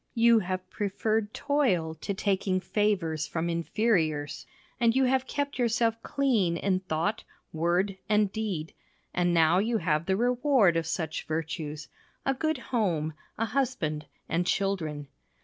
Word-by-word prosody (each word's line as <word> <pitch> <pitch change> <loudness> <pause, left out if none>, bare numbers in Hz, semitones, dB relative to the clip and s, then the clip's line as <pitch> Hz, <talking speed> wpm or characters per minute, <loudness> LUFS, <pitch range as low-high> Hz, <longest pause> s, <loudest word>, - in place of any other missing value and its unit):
You 230 0 +6
have 185 -1 -3
preferred 215 +1 -1
toil 240 - +1
to 160 +5 -4
taking 190 -1 0
favours 185 -5 0
from 170 +1 -2
inferiors, 165 -4 0 0.3
and 230 0 +3
you 265 - +4
have 260 0 +2
kept 285 -1 -3
yourself 230 -1 +1
clean 230 - +1
in 185 +1 +1
thought, 185 +4 -2 0.3
word, 175 +4 0
and 210 -2 +3
deed, 195 -8 -3 0.4
and 175 0 +2
now 165 +1 +4
you 225 +3 +1
have 155 -4 0
the 190 0 +2
reward 245 - +3
of 165 -1 0
such 160 -2 -3
virtues 155 -1 -4 0.4
a 270 - +2
good 315 +3 -1 0.2
home, 165 -9 +1 0.2
a 225 - +1
husband, 175 - -1 0.2
and 175 +2 0
children. 160 -8 -1
190 Hz, 140 wpm, -28 LUFS, 165-230 Hz, 0.4 s, You